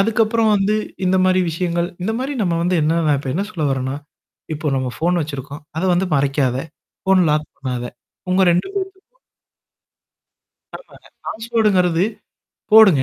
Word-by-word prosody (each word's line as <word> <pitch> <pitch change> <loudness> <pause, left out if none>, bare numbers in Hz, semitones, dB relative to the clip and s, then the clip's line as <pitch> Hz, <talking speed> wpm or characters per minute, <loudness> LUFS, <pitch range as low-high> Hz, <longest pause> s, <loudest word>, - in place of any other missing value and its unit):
அதுக்கப்புறம் 225 +1 +2
வந்து 205 +1 +2 0.3
இந்தமாரி 185 0 +3
விஷயங்கள் 170 +1 -1
இந்தமாரி 245 +8 -2
நம்ம 175 -4 0
வந்து 180 +2 +1
என்னன்னா 165 +2 +1
நான் 150 -2 +3
இப்ப 135 -1 -4
என்ன 190 - 0
சொல்ல 170 -6 -4
வரேன்னா, 130 0 -2 0.6
இப்போ 155 +1 -5
நம்ம 130 -1 -1
ஃபோன் 175 +2 +1
வச்சிருக்கோம். 145 -1 -6
அத 160 - -1
வந்து 185 +2 +1
மறைக்காத. 135 -2 +1 0.5
ஃபோன்ன 190 -2 +4
லாக் 150 0 0
பண்ணாத. 125 -2 -3 0.4
உங்க 185 +1 +3
2 175 +1 +1
பேத்துக்கும் 385 +5 -6 1.6
ஆமாங்க. - - -18 0.2
பாஸ்வேர்ட்டுங்கிறது 210 -7 +1 0.7
போடுங்க. 205 -11 +8
180 Hz, 135 wpm, -20 LUFS, 150-210 Hz, 1.6 s, போடுங்க